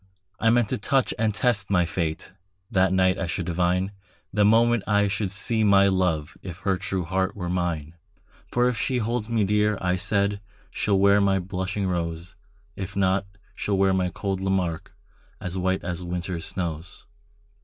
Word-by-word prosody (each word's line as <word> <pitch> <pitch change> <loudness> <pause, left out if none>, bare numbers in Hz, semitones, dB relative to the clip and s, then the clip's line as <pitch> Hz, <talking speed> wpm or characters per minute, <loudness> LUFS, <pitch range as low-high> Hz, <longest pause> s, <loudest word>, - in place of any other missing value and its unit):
I 115 - +3
meant 120 -2 +3
to - - -1
touch 135 +5 +1
and 110 -1 +2
test 105 -2 0
my 90 -3 +3
fate; 80 0 -3 0.4
That 95 -1 +3
night 95 0 +3
I 95 - -2
should 85 +1 -3
divine, 90 +2 0 0.4
The 105 +1 +3
moment 115 +2 +4
I 105 -1 +3
should 100 0 -1
see 110 +3 0
my 100 -1 +5
love, 85 -5 0
If 90 -3 -7
her 95 0 +1
true 95 0 -2
heart 95 +2 -1
were 90 -4 -4
mine. 85 -4 -2 0.6
For 120 0 +3
if 125 - 0
she 130 +2 -1
holds 115 -1 -2
me 115 -2 +2
dear, 105 +1 +2
I 90 0 0
said, 100 +1 0 0.3
She'll 100 -2 +1
wear 100 +1 +5
my 100 -1 +3
blushing 95 +2 -3
rose; 85 0 -3 0.4
If 95 0 -6
not, 95 0 +1 0.3
she'll 100 -2 -1
wear 95 0 +3
my 90 -1 +1
cold 95 +2 -3
Lamarque, 95 -4 -1 0.5
As 90 0 -5
white 95 0 0
as 90 0 -3
winter's 85 -1 -4
snows. 85 -2 -5
95 Hz, 175 wpm, -25 LUFS, 90-105 Hz, 0.6 s, my